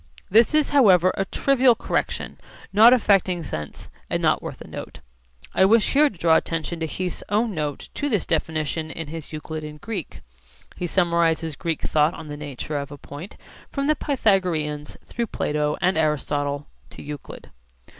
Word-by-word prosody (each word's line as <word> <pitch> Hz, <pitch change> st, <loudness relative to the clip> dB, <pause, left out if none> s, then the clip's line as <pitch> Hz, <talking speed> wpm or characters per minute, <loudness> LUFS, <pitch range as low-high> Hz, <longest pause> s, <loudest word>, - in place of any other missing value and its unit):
This 225 Hz, +8 st, +5 dB
is 305 Hz, -1 st, +2 dB
however 185 Hz, -, +5 dB
a 195 Hz, -, -1 dB
trivial 260 Hz, +2 st, +3 dB
correction -, -, -3 dB, 0.3 s
not 220 Hz, +4 st, +8 dB
affecting 195 Hz, -7 st, +3 dB
sense 75 Hz, -, -7 dB, 0.2 s
and -, -, 0 dB
not -, -, +2 dB
worth -, -, -7 dB
a -, -, -9 dB
note. -, -, -8 dB, 0.5 s
I -, -, +4 dB
wish 220 Hz, +2 st, +4 dB
here 295 Hz, +1 st, +5 dB
to 195 Hz, -, -15 dB
draw 165 Hz, -1 st, +4 dB
attention 165 Hz, +1 st, -3 dB
to 160 Hz, -, -2 dB
Heath's 180 Hz, +2 st, -4 dB
own 215 Hz, +2 st, +1 dB
note 150 Hz, -4 st, -4 dB
to 290 Hz, -, -2 dB
this 210 Hz, -8 st, 0 dB
definition 155 Hz, 0 st, -1 dB
in 160 Hz, 0 st, -6 dB
his 160 Hz, -1 st, -7 dB
Euclid 155 Hz, 0 st, -6 dB
in 150 Hz, 0 st, -8 dB
Greek. 195 Hz, -, -6 dB, 0.5 s
He 180 Hz, -, -3 dB
summarises 170 Hz, -3 st, +1 dB
Greek 165 Hz, -1 st, -3 dB
thought 155 Hz, +1 st, +2 dB
on 155 Hz, -, -9 dB
the 145 Hz, -, -5 dB
nature 145 Hz, 0 st, -5 dB
of 140 Hz, 0 st, -6 dB
a 145 Hz, -, -8 dB
point, 145 Hz, +8 st, -10 dB, 0.3 s
from 275 Hz, -1 st, -2 dB
the 305 Hz, +1 st, +3 dB
Pythagoreans, 180 Hz, -, 0 dB
through 235 Hz, -1 st, -3 dB
Plato 150 Hz, -5 st, -1 dB
and 180 Hz, -2 st, +2 dB
Aristotle, 145 Hz, -2 st, -1 dB, 0.2 s
to -, -, -11 dB
Euclid. 145 Hz, -1 st, -9 dB
165 Hz, 170 wpm, -23 LUFS, 150-205 Hz, 0.5 s, not